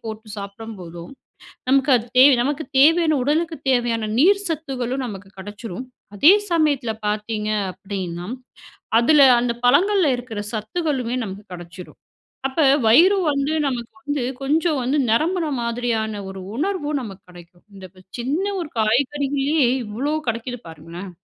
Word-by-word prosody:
போட்டு 220 0 -7
சாப்பிடும்போதோ, 200 -4 -8 0.7
நமக்கு 270 +1 +3
அது 235 -1 -1
தேவ 270 +3 +9
நமக்கு 290 +3 -2 0.2
தேவையான, 315 +1 +5
உடலுக்குத் 315 +2 -1
தேவையான 230 -3 0
நீர் 395 +7 +5
சத்துக்களும் 270 -5 -3
நமக்கு 195 -3 -8
கிடைச்சுரும். 205 +3 -7 0.3
அதே 310 - +7 0.2
சமயத்தில 285 -8 +1
பார்த்தீங்க 210 0 -2 0.2
அப்படின்னா, 180 -3 -6 0.7
அதுல 290 +4 +5 0.2
அந்த 240 0 0
பழங்கள்ல 355 +5 +4
இருக்கிற 235 -4 -7
சத்துக்களுமே 255 +2 -2
நமக்கு 200 +1 -8
கிடைச்சுரும். 175 +1 -12 0.5
அப்ப 270 +4 -1 0.3
வயிறு 360 - +6
வந்து 280 +2 -1
நமக்கு 240 -3 -4
வந்து 290 -2 -2 0.2
கொஞ்சம் 305 +2 +1
வந்து 265 +4 0
நிரம்புற 325 +9 +1 0.2
மாதிரியான 230 -3 -2
ஒரு 195 0 -8 0.2
உணர்வு 345 0 -2
நமக்கு 200 -5 -9
கிடைக்கும். 175 0 -16
இந்த 190 -1 -10
வ 185 - -17 0.2
சின்ன 290 +11 -1 0.2
ஒரு 320 - -6
காய்கறிகள்ளயே 275 +4 +1 0.2
இவ்வளோ 245 +8 -3 0.2
கிடைக்குது 235 +2 -4
பாருங்களேன். 165 +4 -9
245 Hz, 125 wpm, -21 LUFS, 210-295 Hz, 0.7 s, தேவ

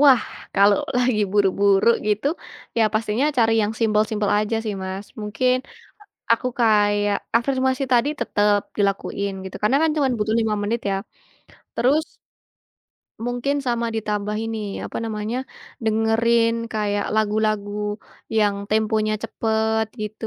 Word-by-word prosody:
Wah, 275 -4 +7 0.3
kalau 200 0 +5 0.2
lagi 245 -3 +2
buru-buru 200 +1 +3 0.2
gitu, 210 +5 0 0.5
ya - - +5
pastinya 220 +5 +1
cari 225 -1 +4
yang 210 +1 -1
simpel-simpel 215 -1 +1
aja 215 +2 0
sih 210 - -2
Mas, 190 +2 -5
mungkin 250 +5 +1 0.8
aku 230 +2 +2
kayak 205 -2 +3 0.2
afirmasi 260 +2 0
tadi 245 +4 +4
tetep 205 0 +2 0.2
dilakuin 200 0 -1
gitu, 190 - -8
karena 250 +6 +3
kan 320 - +3
cuman 275 -4 +2
butuh 215 +1 0
5 220 -2 0
menit 225 +3 -1
ya, 195 - +1 0.8
terus 290 +6 +2 1.2
mungkin 245 +4 -1
sama 235 -3 -1
ditambah 210 -1 -2
ini, 220 -3 -4
apa - - -6
namanya, 225 +3 -3 0.4
dengerin 230 +1 +2 0.2
kayak 205 -1 -1
lagu-lagu 210 -1 -1 0.3
yang 205 -2 +1
temponya 215 0 +1
cepet 220 -1 0
gitu, 215 +1 -5
220 Hz, 125 wpm, -22 LUFS, 205-230 Hz, 1.2 s, Wah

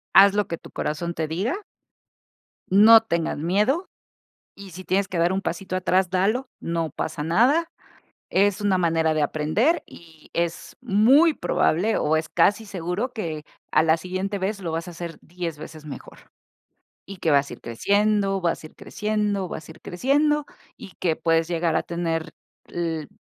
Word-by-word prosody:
Haz 195 0 +8
lo 205 0 0
que 170 - -4
tu - - -14
corazón 170 +3 -3
te 160 -2 -2
diga. 190 - -1 1.1
No 220 +4 +8
tengas 170 -9 -2
miedo, 210 - +1 0.7
Y 200 -1 -11
sí 185 +2 -9
tienes 195 +2 0
que 180 - -3
dar 170 +2 +2
un 195 - -1
pasito 195 -2 -4
atrás, 185 0 +1
dalo, 215 +8 0
no 165 -1 -2
pasa 160 +2 -4
nada. 255 - +3 0.6
Es 200 +1 +2
una 200 -2 +2
manera 165 -2 +2
de 155 - 0
aprender 155 - +1
y 160 -2 -16
es 170 0 -3
muy 255 +9 +5
probable 205 - +1
o 155 +1 +2
es 160 - -2
casi 205 +6 +2
seguro 195 +5 -3
que 160 -9 -4 0.3
a - - +4
la 160 0 +4
siguiente 185 +4 -3
vez 200 +2 -2
lo 175 -4 -4
vas 165 +2 -3
a - - -8
hacer 170 -1 -7
10 170 -2 -6
veces 155 0 -10
mejor 145 - -11 0.8
y 195 - -8
que 165 - 0
vas 140 -1 +3
a - - -7
ir - - -18
creciendo, 200 - +1
vas 170 -2 -1
a - - -8
ir - - -26
creciendo, 210 -3 -2
vas 155 - -7
a 160 - -9
ir - - -20
creciendo 290 +9 +1 0.3
y 190 - -11
que 170 -3 +1
puedes 165 0 +1
llegar 165 -1 0
a - - +1
tener, 165 -1 -3 0.4
l 165 -3 -3
180 Hz, 175 wpm, -24 LUFS, 165-205 Hz, 1.1 s, Haz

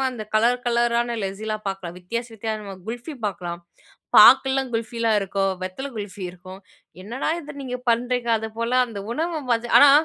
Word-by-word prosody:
அந்த 220 -3 -6
கலர் 235 +3 +4
கலரான 235 0 +1
லெஸ்ஸிலாம் 215 +2 -4
பாக்கலாம், 190 -3 -5
வித்தியாச 230 +7 -4
வித்தியாசமா 215 -2 -4
குல்ஃபி 240 +7 -6
பாக்கலாம், 175 -3 -4 0.6
பாக்கெல்லாம் 265 +3 +7
குல்ஃபிலா 230 0 0
இருக்கும், 195 0 0
வெத்தல 265 +10 -5
குல்ஃபி 200 -2 -6
இருக்கும். 185 +2 -12 0.4
என்னடா 235 +7 -3
இத 295 -1 -10
நீங்க 250 -1 -4
பண்ணுறீங்க? 245 +1 0
அது 220 0 -5
போல, 230 +1 -1
அந்த 220 -4 -7
உணவு 330 +4 -2 0.2
வந்து 235 +1 -4
ஆனா 285 -1 +9
230 Hz, 150 wpm, -23 LUFS, 195-245 Hz, 0.6 s, ஆனா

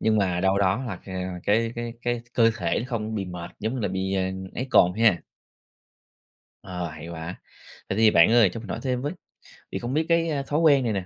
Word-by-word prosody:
nhưng 110 -1 +2
mà 90 -3 +1
đâu 95 +1 +2
đó 100 +6 +1
là, - - -5
ờ, 95 - -7 0.3
cái 115 +2 +2
cái 120 0 -4
cái 120 -1 -1
cơ 115 -1 +5
thể - - 0
nó - - -4
không 110 -3 -3
bị 100 -3 -2
mệt, 90 -1 -7
giống 110 +4 -2
như 125 - -3
là 105 - 0
bị, 95 +1 -2
ờ, 95 - +1 0.3
ấy 130 - -3
cồn 90 -6 +5
ha. 110 -7 +4 1.4
Ờ, 90 -2 -4
hay 80 +1 -9
quá. 85 +1 -7 0.5
Vậy 95 - -2
thì 110 -1 +6
bạn 85 +3 +6
ơi 115 -5 +5
cho 115 - -6
mình 110 - -10
hỏi - - -3
thêm 125 -2 -1
với, 145 +4 -2 0.6
thì - - -3
không 120 +2 -4
biết 155 +1 +1
cái, 165 0 +3
a, 140 -3 -1
thói 145 +3 -1
quen 145 -5 +5
này 115 -3 0
nè, 95 -2 -2
110 Hz, 240 wpm, -25 LUFS, 95-120 Hz, 1.4 s, thì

